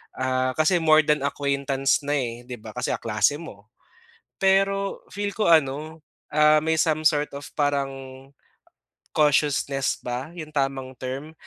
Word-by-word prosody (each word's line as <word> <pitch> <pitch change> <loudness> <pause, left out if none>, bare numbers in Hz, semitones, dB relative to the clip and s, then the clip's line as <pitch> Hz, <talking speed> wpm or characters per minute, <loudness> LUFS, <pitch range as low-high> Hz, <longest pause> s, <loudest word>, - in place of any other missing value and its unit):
ah, 130 0 0
kasi 155 +3 +3
more 155 -1 +6
than 150 -2 +1
acquaintance 140 -1 0
na 145 - 0
eh, 120 -2 -4
'di 125 - -6
ba, 110 - -9
kasi 125 0 -2
kaklase 115 +6 +1
mo. 105 -10 -12 0.7
Pero 195 +1 +1
feel 205 0 -2
ko 215 - 0
ano, 155 +1 +1 0.3
ah, 150 0 +5
may 160 0 +1
some 155 -3 +1
sort 150 -2 +3
of 145 - -9
parang 140 -2 +1 1.2
cautiousness 145 -2 +1
ba 125 +4 -4
'yong 155 -3 -8
tamang 135 -2 -1
term? 135 +5 -6
145 Hz, 140 wpm, -24 LUFS, 135-155 Hz, 1.2 s, more